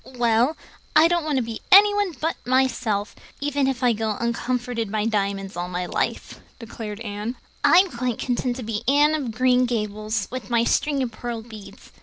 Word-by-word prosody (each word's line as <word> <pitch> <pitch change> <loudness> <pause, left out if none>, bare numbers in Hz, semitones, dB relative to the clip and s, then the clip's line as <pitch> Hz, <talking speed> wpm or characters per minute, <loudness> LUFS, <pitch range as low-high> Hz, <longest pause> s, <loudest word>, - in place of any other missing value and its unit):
"Well, 240 +5 +2 0.4
I 315 +1 +7
don't 345 -1 +1
want 300 -2 0
to 255 - +1
be 225 -1 -6
anyone 410 -1 +6
but 320 +2 -2
myself, 245 -5 0 0.2
even 285 -1 0
if 260 -1 -2
I 245 -1 +4
go 220 -1 -2
uncomforted 235 -1 -2
by 215 -1 0
diamonds 200 -3 -1
all 175 +1 -4
my 180 0 -3
life," - - -3 0.2
declared 220 -3 -7
Anne. 210 +2 -4 0.3
"I'm 370 +3 +6
quite 245 -1 -2
content 245 -1 -1
to 255 - -6
be 215 -1 -3
Anne 290 +3 +4
of 290 -6 -2
Green 250 +2 +3
Gables, 215 -2 -2
with 255 -5 -6
my 235 -1 +2
string 275 +2 +1
of 240 - -3
pearl 230 0 -5
beads. 220 -3 -13
240 Hz, 180 wpm, -23 LUFS, 215-265 Hz, 0.4 s, I